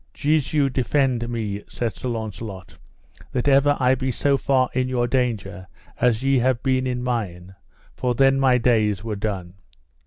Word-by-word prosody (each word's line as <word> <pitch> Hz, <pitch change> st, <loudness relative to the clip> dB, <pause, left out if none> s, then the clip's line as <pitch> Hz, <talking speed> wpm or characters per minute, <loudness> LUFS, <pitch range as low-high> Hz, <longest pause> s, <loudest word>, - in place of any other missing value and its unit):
Jesu 150 Hz, -1 st, +1 dB
defend 130 Hz, -2 st, 0 dB
me, 105 Hz, -4 st, -3 dB
said 115 Hz, -5 st, -3 dB
Sir 130 Hz, -, -4 dB
Launcelot, 110 Hz, -4 st, -6 dB, 0.6 s
that 125 Hz, +1 st, -1 dB
ever 145 Hz, +1 st, +4 dB
I 130 Hz, 0 st, +4 dB
be 130 Hz, 0 st, -2 dB
so 140 Hz, +3 st, +1 dB
far 135 Hz, -2 st, +2 dB
in 130 Hz, 0 st, 0 dB
your 125 Hz, -2 st, +1 dB
danger 105 Hz, -7 st, -2 dB, 0.3 s
as 120 Hz, -1 st, +2 dB
ye 135 Hz, -1 st, +3 dB
have 125 Hz, 0 st, +1 dB
been 130 Hz, -1 st, +1 dB
in 125 Hz, -1 st, -2 dB
mine, 95 Hz, -7 st, -3 dB, 0.4 s
for 125 Hz, -1 st, -1 dB
then 135 Hz, +1 st, +4 dB
my 130 Hz, -2 st, +4 dB
days 110 Hz, -5 st, +1 dB
were 110 Hz, -2 st, -3 dB
done. 100 Hz, -4 st, -4 dB
125 Hz, 160 wpm, -23 LUFS, 110-130 Hz, 0.6 s, ever